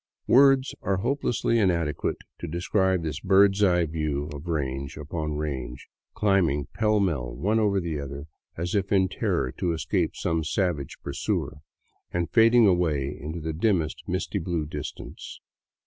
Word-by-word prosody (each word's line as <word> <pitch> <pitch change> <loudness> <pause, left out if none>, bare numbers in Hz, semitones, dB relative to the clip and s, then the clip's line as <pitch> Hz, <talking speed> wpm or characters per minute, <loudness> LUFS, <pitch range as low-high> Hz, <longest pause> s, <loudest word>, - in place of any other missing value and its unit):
Words 135 0 +5
are 100 -1 0
hopelessly 120 0 0
inadequate 85 -7 0 0.2
to - - -5
describe 95 +2 +1
this 75 -3 -3
bird's 95 +3 +4
eye 90 -3 +4
view 75 -2 -2
of 75 +4 -8
range 70 -4 -3
upon 75 +1 -4
range, 65 -5 -4 0.3
climbing 90 -9 +2
pell 110 -1 +2
mell 70 -11 -1
one 105 - +1
over 100 -2 +2
the 85 -4 -3
other, 70 +1 -6 0.3
as 85 +1 -3
if 100 -2 0
in 95 -2 +3
terror 65 - -1
to 85 -2 -1
escape 80 - -1
some 80 -1 -1
savage 80 -3 -1
pursuer, - - -2 0.5
and 85 -1 -2
fading 115 0 +6
away 80 -7 +1
into 80 +3 -5
the 80 0 -4
dimmest 85 -3 0
misty 95 +3 -2
blue 85 -3 -2
distance. 75 -1 -7
85 Hz, 150 wpm, -26 LUFS, 75-100 Hz, 0.5 s, fading